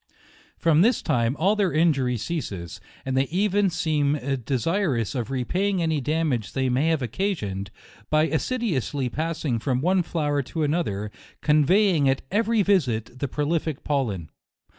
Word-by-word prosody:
From 165 -1 +3
this 230 +4 +3
time 115 +2 +1
all 195 +7 +3
their 200 -4 +1
injury 140 -6 +2
ceases, 95 - -5 0.2
and 130 0 -2
they 135 +1 +3
even 200 +3 +1
seem 155 -4 +1 0.3
desirous 135 - 0
of 125 -3 -3
repaying 180 - 0
any 160 -3 0
damage 140 -7 -1
they 130 -1 0
may 130 +5 +1
have 160 -4 +1
occasioned, 105 - -2 0.4
by 155 0 +3
assiduously 160 - -1
passing 155 -4 -2
from 125 +1 0
one 180 +6 +2
flower 150 -4 -1
to 155 +4 -3
another, 125 - -1 0.3
conveying 155 +1 +4
at 135 - 0
eve 220 +1 +2
ry 225 -3 +3
visit, 125 - 0
the 140 - -1
prolific 150 +1 -2
pollen. 110 - -2
150 Hz, 145 wpm, -24 LUFS, 125-170 Hz, 0.4 s, conveying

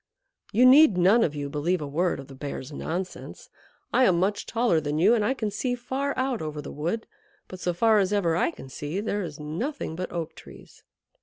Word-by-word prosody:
You 240 +5 +5
need 260 -5 +7
none 195 +6 +5
of 150 - -1
you 145 -1 -3
believe 155 +6 -1
a 150 - -4
word 165 +5 0
of 135 - -9
the 135 - -12
Bear's 135 0 -6
nonsense. 180 +5 -6 0.4
I 260 - +5
am 180 -6 +3
much 200 +3 -1
taller 230 -9 +2
than 145 0 -2
you, 195 +8 +5
and 225 -3 +2
I 260 +6 +1
can 215 -5 -2
see 245 +4 -1
far 265 +3 -3
out 260 -3 -1
over 155 -1 -5
the 145 - -7
wood. 170 +10 -3 0.4
But 185 - -9
so 180 - 0
far 215 +5 +3
as 195 -1 +1
ever 185 -6 +1
I 175 - +2
can 150 - -10
see, 145 +7 -5
there 205 -1 -2
is 155 -6 -6
nothing 160 - -4
but 185 +2 -5
Oak 170 -2 -4
Trees." - - -15
185 Hz, 220 wpm, -26 LUFS, 155-225 Hz, 0.4 s, need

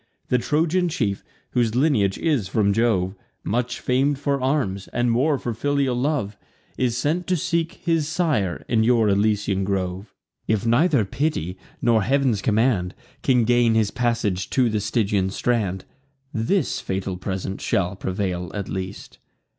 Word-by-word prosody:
The 125 - +3
Trojan 165 +7 +1
chief, 105 -11 -1 0.3
whose 120 -2 +1
lineage 125 -9 +2
is 145 - 0
from 100 +1 +2
Jove, 100 -5 +1 0.3
Much 125 +3 -1
fam'd 135 +3 +1
for 140 -1 -1
arms, 130 -9 0
and 120 0 0
more 140 +5 +2
for 120 -2 -3
filial 140 +1 0
love, 125 -5 -1 0.4
Is 120 -2 0
sent 160 +7 -1
to 185 -1 +1
seek 165 0 -1
his 165 -4 0
sire 155 - 0
in 110 -2 +2
your 115 -2 +3
Elysian 100 -1 +1
grove. 95 +1 -3 0.3
If 110 -1 +1
neither 130 - +3
piety, 95 - -2 0.3
nor 115 -2 +4
Heav'n's 130 -2 +1
command, 105 -4 +1 0.3
Can 125 -4 +3
gain 120 -1 +3
his 110 -2 +2
passage 115 -6 -1
to 125 -3 +2
the 110 - 0
Stygian 100 -2 0
strand, 100 -3 -1 0.5
This 120 - 0
fatal 95 0 -3
present 95 +1 -4
shall 90 0 0
prevail 95 -2 -3
at 100 -2 -3
least." 95 0 -6
115 Hz, 145 wpm, -23 LUFS, 100-135 Hz, 0.5 s, nor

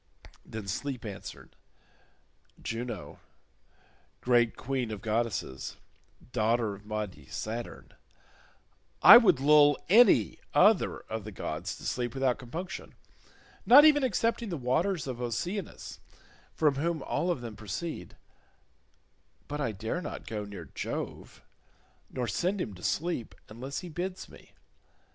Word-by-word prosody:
Then 110 -2 -8
Sleep 125 +5 -4
answered, 100 -2 -9 1.0
"Juno, 115 -3 -5 1.0
great 120 -2 +3
queen 130 -2 -2
of 105 -2 -5
goddesses, 110 - -2 0.5
daughter 115 -1 +1
of 100 +1 -13
mighty 105 -10 -5
Saturn, 115 +2 -6 1.1
I - - +12
would 190 - +5
lull 145 0 +6
any 235 +6 +5 0.2
other 210 -3 +4
of 110 -1 -6
the 110 - -8
gods 90 0 -4
to - - -13
sleep 120 0 -2
without 135 -1 +1
compunction, 165 +8 -7 0.7
not 285 +5 +9
even 295 -2 +6
excepting 230 -1 0
the 170 - -3
waters 155 +8 0
of 125 -2 -5
Oceanus 165 - -4 0.6
from 150 -3 +2
whom 160 0 -1
all 175 - -1
of 170 -8 -1
them 115 -3 -7
proceed, 110 - -6 1.3
but 150 0 -4
I 115 - 0
dare 110 - -4
not - - -7
go 105 -2 -4
near 100 -5 -8
Jove, - - -6 0.7
nor 125 -2 -3
send 180 - -1
him 115 - -3
to 90 - -13
sleep 120 - -2
unless 130 +7 -6
he 180 - -8
bids 180 +3 -5
me. - - -17
125 Hz, 125 wpm, -29 LUFS, 110-170 Hz, 1.3 s, I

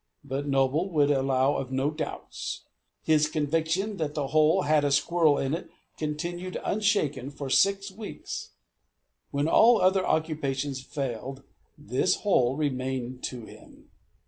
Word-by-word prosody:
But 140 +1 -4
Noble 140 +6 +1
would 145 -4 +3
allow 135 0 +2
of 130 -1 -4
no 135 +3 0
doubts. 155 - -5 0.4
His 155 -1 +3
conviction 165 +7 -1
that 150 -2 -3
that 145 -2 -1
hole 155 0 +4
had 150 0 +3
a 145 - +1
squirrel 150 +1 +3
in 135 +1 -1
it 170 - -4 0.3
continued 175 +4 -4
unshaken 195 - 0
for 140 -2 -6
six 195 +3 +3
weeks. 190 - -7 0.8
When 145 +2 0
all 230 +7 +6
other 190 0 +3
occupations 145 -5 -1
failed, 135 -1 -5 0.3
this 125 - +1
hole 130 - +2
remained 130 -3 -2
to 120 -3 -6
him. - - -16
145 Hz, 135 wpm, -27 LUFS, 135-165 Hz, 0.8 s, all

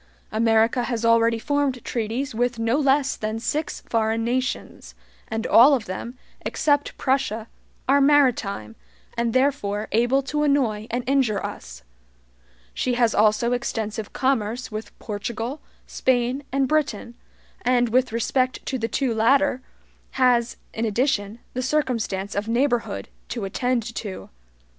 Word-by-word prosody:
America 225 +2 +2
has 235 -2 -2
already 230 0 +4
formed 280 0 -1
treaties 235 +4 -2
with 245 +1 0
no 230 +5 +1
less 275 -1 +2
than 215 +1 -3
six 295 +7 -2
foreign 225 0 0
nations, 240 - -3 0.3
and 225 0 -3
all 270 +5 +7
of 235 -4 -4
them, 235 +6 -6 0.3
except 290 -1 0
Prussia, 260 -5 0 0.4
are 280 +2 +4
maritime, 245 - +2 0.4
and 235 0 0
therefore 240 -6 0
able 240 +5 +2
to 295 +2 -2
annoy 250 -8 +1
and 245 +1 -2
injure 260 -7 +1
us. - - -8 0.9
She 250 -1 -1
has 235 -2 +3
also 215 +3 +3
extensive 220 -3 -3
commerce 250 -3 -1
with 215 +1 -7
Portugal, 230 +6 -4 0.2
Spain, 250 +1 0
and 270 0 +1
Britain, 255 -6 -1 0.5
and, 245 -1 +2
with 255 +1 +2
respect 255 +3 0
to 260 - -2
the 225 - -1
two 260 0 0
latter, 260 +4 +3 0.5
has, 245 -2 +2 0.2
in 225 - -3
addition, 220 -2 0 0.2
the 255 - -2
circumstance 235 -8 -1
of 205 +2 -2
neighborhood 240 +1 0 0.2
to 230 -5 -3
attend 245 +4 0
to. 205 -4 -6
240 Hz, 135 wpm, -23 LUFS, 220-265 Hz, 0.9 s, all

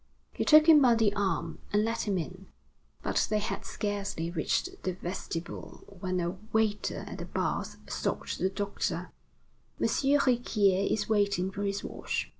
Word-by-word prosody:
He - - -1
took 305 0 +8
him 310 -3 +9
by 245 -3 +6
the 220 -3 +3
arm, 190 -5 -1
and 210 +1 +3
led 230 +1 -1
him 200 -3 0
in. 185 +3 -6 0.6
But - - +1
they 215 - +2
had 210 - -3
scarcely 200 -5 -3
reached 365 - -1
the 185 - -1
vestibule 175 -1 -6 0.2
when 185 -1 -1
a 175 +2 -2
waiter 220 -2 0
at - - -7
the - - -4
baths - - -2
stopped - - -3
the 185 - +2
doctor: 200 +1 -3 0.7
"M. - - +1
Riquier 240 -8 +2
is 210 -1 0
waiting 200 -3 +1
for 195 - -5
his 200 0 -1
wash." - - -3
200 Hz, 160 wpm, -30 LUFS, 185-220 Hz, 0.7 s, him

